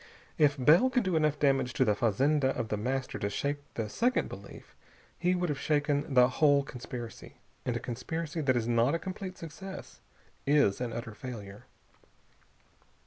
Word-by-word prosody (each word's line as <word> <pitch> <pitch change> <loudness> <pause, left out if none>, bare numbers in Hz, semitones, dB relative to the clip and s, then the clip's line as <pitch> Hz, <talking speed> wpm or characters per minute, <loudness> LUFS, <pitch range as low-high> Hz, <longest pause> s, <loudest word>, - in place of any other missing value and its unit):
If 145 -2 +5
Bell 155 - +5
could 250 -2 +1
do 185 -3 0
enough 155 -2 +2
damage 135 -3 +2
to 130 - +2
the 105 - +3
fazenda 130 +6 +2
of 110 - -3
The - - 0 0.2
Master 135 -1 -3
to 100 - -1
shake 140 +7 -2 0.2
the 115 -2 -2
second 245 - +1
belief, - - -11 0.4
he 180 +1 +2
would 180 -1 -1
have 145 - -2
shaken 145 -2 0
the 125 -1 +7
whole 140 +1 +3
conspiracy. 120 -3 -8 0.3
And 120 -1 0
a - - -4
conspiracy 150 +7 -4
that 130 -4 +2
is 115 -1 -1
not 120 +5 +3
a - - +2
complete 185 +1 -6
success 190 +4 -9 0.5
is 140 -8 +3
an 120 -2 -2
utter 115 -1 -5
failure. 105 -2 -9
140 Hz, 170 wpm, -30 LUFS, 120-155 Hz, 0.5 s, the